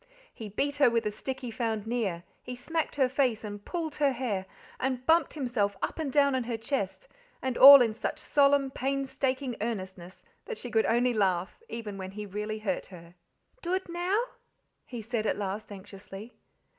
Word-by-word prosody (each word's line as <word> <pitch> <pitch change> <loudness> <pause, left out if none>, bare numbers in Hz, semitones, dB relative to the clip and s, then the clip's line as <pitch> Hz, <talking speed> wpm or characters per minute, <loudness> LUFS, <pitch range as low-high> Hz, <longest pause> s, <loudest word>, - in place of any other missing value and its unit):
He 220 -2 -8
beat 280 +8 -1
her 280 -4 +6
with 230 -1 0
a 210 - 0
stick 265 +5 -5
he 245 -3 -5
found 225 -3 -2
near, 215 -7 -2 0.2
he 250 - -7
smacked 320 +6 -3
her 270 -3 +3
face 255 -4 0
and 205 -1 -7
pulled 325 - -4
her 285 -2 +3
hair 215 -7 -2 0.3
and 255 -1 -2
bumped 325 0 +3
himself 235 -8 -1
up - - -3
and 300 -4 -2
down 280 0 +4
on 255 -2 0
her 235 -1 -2
chest, 230 - -3 0.3
and 260 -2 -2
all 275 0 +11
in 225 -2 0
such 220 - -3
solemn, 280 -1 +3
painstaking 270 -1 -2
earnestness 190 -5 -5 0.2
that 465 - -5
she 245 - -8
could 220 0 +2
only 240 +2 +2
laugh 190 -4 0
even 210 -4 -6
when 190 0 -5
he 210 +1 -6
really 210 +2 -4
hurt 205 -4 -3
her. 170 -2 -13 0.5
"Dood 370 +2 -1
now?" 355 +4 0 0.7
he 240 -3 -6
said 225 -1 -2
at - - 0
last 205 +1 -4
anxiously. 200 +2 -10
235 Hz, 180 wpm, -29 LUFS, 210-275 Hz, 0.7 s, all